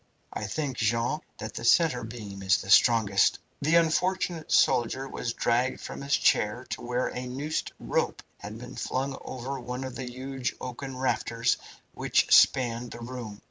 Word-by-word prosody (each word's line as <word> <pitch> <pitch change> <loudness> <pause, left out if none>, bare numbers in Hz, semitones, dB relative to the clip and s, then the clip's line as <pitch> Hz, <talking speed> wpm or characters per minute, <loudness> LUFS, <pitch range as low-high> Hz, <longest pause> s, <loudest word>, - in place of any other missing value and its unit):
I 105 - -3
think, 135 +4 -3
Jean, 115 +6 +1 0.2
that - - -6
the - - -6
centre 125 0 +4
beam 105 -4 -8
is 95 -2 +4
the 95 - -5
strongest." 105 -4 +5 0.2
The 155 +4 +3
unfortunate 170 0 +1
soldier 130 +3 +3
was 120 -3 -4
dragged 120 +2 +1
from - - -7
his 140 0 +2
chair 115 +5 +2
to - - -3
where 125 +1 -1
a 125 0 -5
noosed 140 +5 -3
rope - - -1 0.2
had 105 +2 -8
been 125 +2 -9
flung 135 +1 -2
over 130 +2 -5
one 125 +1 -5
of 130 -1 -5
the 130 -2 -5
huge 130 0 -4
oaken 130 +1 -6
rafters 115 -2 0 0.4
which - - +2
spanned 120 -2 +4
the 120 - -9
room. 115 -4 -7
125 Hz, 165 wpm, -28 LUFS, 115-135 Hz, 0.4 s, strongest